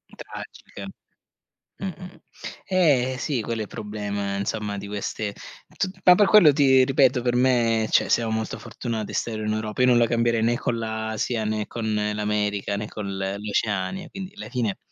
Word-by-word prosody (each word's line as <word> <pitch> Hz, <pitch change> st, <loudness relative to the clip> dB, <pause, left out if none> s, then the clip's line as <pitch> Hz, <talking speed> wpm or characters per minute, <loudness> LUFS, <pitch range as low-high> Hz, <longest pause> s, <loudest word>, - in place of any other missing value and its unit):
Tragiche. -, -, -10 dB, 0.9 s
Mh, 195 Hz, -, -4 dB
mh, 185 Hz, -, -4 dB
mh. 180 Hz, -, -12 dB, 0.5 s
Eh 140 Hz, -9 st, +2 dB
sì, 135 Hz, -3 st, -1 dB
quello 115 Hz, +1 st, -3 dB
è -, -, -1 dB
il -, -, -13 dB
problema, 105 Hz, -2 st, -4 dB
insomma, 105 Hz, 0 st, -3 dB
di 100 Hz, -, -7 dB
queste 105 Hz, 0 st, -4 dB, 0.4 s
tut 190 Hz, 0 st, -2 dB
ma 180 Hz, -, +9 dB
per 205 Hz, +2 st, +4 dB
quello 185 Hz, -9 st, +7 dB
ti 135 Hz, -2 st, +5 dB
ripeto, 130 Hz, -2 st, +3 dB
per 120 Hz, -1 st, 0 dB
me, 120 Hz, -3 st, +3 dB
cioè, -, -, +3 dB
siamo 115 Hz, -2 st, +2 dB
molto 110 Hz, 0 st, -3 dB
fortunati 115 Hz, -2 st, -5 dB
a -, -, -7 dB
stare 110 Hz, -2 st, -2 dB
in 105 Hz, -, 0 dB
Europa. 110 Hz, +1 st, -3 dB
Io 125 Hz, -, +5 dB
non 120 Hz, -1 st, +5 dB
la 120 Hz, -, +4 dB
cambierei 115 Hz, 0 st, +1 dB
né 120 Hz, +2 st, +2 dB
con 115 Hz, -, -1 dB
l'Asia, 110 Hz, +1 st, -2 dB
né 110 Hz, 0 st, -1 dB
con 110 Hz, -2 st, -3 dB, 0.2 s
l'America, 105 Hz, -1 st, -1 dB
né 105 Hz, +1 st, -4 dB
con 105 Hz, -2 st, -6 dB
l 95 Hz, -, -4 dB, 0.2 s
l'Oceania. 105 Hz, -, -2 dB
Quindi 195 Hz, 0 st, -8 dB
la -, -, -7 dB
fine 120 Hz, -5 st, -1 dB
è -, -, -8 dB
115 Hz, 190 wpm, -24 LUFS, 105-130 Hz, 0.9 s, ma